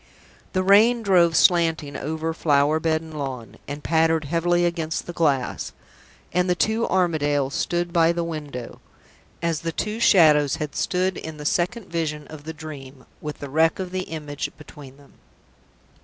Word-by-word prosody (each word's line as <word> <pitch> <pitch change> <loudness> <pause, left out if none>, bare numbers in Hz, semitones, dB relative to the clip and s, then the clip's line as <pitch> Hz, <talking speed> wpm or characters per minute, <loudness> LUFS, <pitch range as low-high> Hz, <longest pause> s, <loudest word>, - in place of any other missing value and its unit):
The 185 - +1
rain 220 +5 +5
drove 175 -5 +4
slanting 165 -5 +3
over 160 +2 -3
flower 150 -1 +2
bed 160 0 0
and 160 -1 -11
lawn, 130 -5 -6
and 145 +1 -6
pattered 160 -1 +2
heavily 175 +3 +1
against 165 -2 -2
the 175 - -7
glass; 145 -7 0 0.6
and 180 +1 +1
the 180 - +3
two 220 +5 +1
Armadales 145 -6 +1
stood 175 +1 -1
by 165 -1 +4
the 170 0 -2
window, 150 -7 -6 0.6
as 165 -2 0
the 165 - -2
two 210 +6 -3
Shadows 155 - +5
had 150 -3 -5
stood 185 0 0
in 160 -1 -7
the 150 - -8
Second 185 +8 0
Vision 155 -4 -3
of 155 -1 -11
the 160 - -4
Dream, 135 -3 -10 0.2
with 150 -1 -5
the 145 - -7
wreck 160 +2 +3
of 185 -2 -5
the 185 0 -3
image 150 -3 -5
between 140 -3 -13
them. 145 -1 -20
160 Hz, 165 wpm, -23 LUFS, 150-175 Hz, 0.6 s, rain